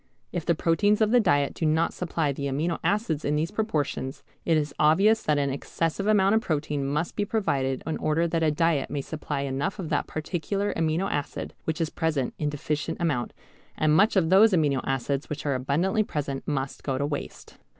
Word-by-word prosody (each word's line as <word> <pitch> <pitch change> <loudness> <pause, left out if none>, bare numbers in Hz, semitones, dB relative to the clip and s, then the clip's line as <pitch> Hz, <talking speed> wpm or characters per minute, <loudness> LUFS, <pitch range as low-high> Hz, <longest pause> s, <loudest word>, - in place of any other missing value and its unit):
If 175 -3 -4
the 170 - +3
proteins 205 +7 +2
of 215 -1 +3
the 245 - +6
diet 145 -9 +2
do - - -6
not 160 +1 +2
supply 165 -4 -1
the 140 +1 -3
amino 155 +5 -1
acids 200 -8 0
in 145 - 0
these 160 +4 -1
proportions, 155 -10 -2 0.2
it 165 -2 +3
is 150 -1 -1
obvious 195 +9 +4
that 150 -1 +1
an 140 -1 +1
excessive 165 +7 -2
amount 200 -2 +4
of 220 - +3
protein 150 - -1
must 150 +4 -2
be 205 - 0
provided 145 - -1
in 160 - -2
order 165 +2 +1
that 165 0 0
the 160 -1 +2
diet 150 -2 +1
may 140 - -2
supply 145 -1 -4
enough 140 +7 -2
of 175 -5 -5
that - - 0
particular 195 +6 -2
amino 165 +3 0
acid 145 -4 -3
which 160 -1 -2
is 165 -1 -1
present 155 -6 -1
in 150 - 0
deficient 150 0 -3
amount, 150 -8 0 0.5
and 155 0 +3
much 210 +7 +4
of 175 -3 +2
those 205 +3 +7
amino 145 -6 +2
acids 135 +1 -2
which 150 -1 -5
are 145 - +1
abundantly 150 +11 +1
present 145 -8 -3
must 135 -2 -2
go 135 -2 -2
to 140 - 0
waste. 145 0 -6
155 Hz, 200 wpm, -26 LUFS, 145-180 Hz, 0.5 s, those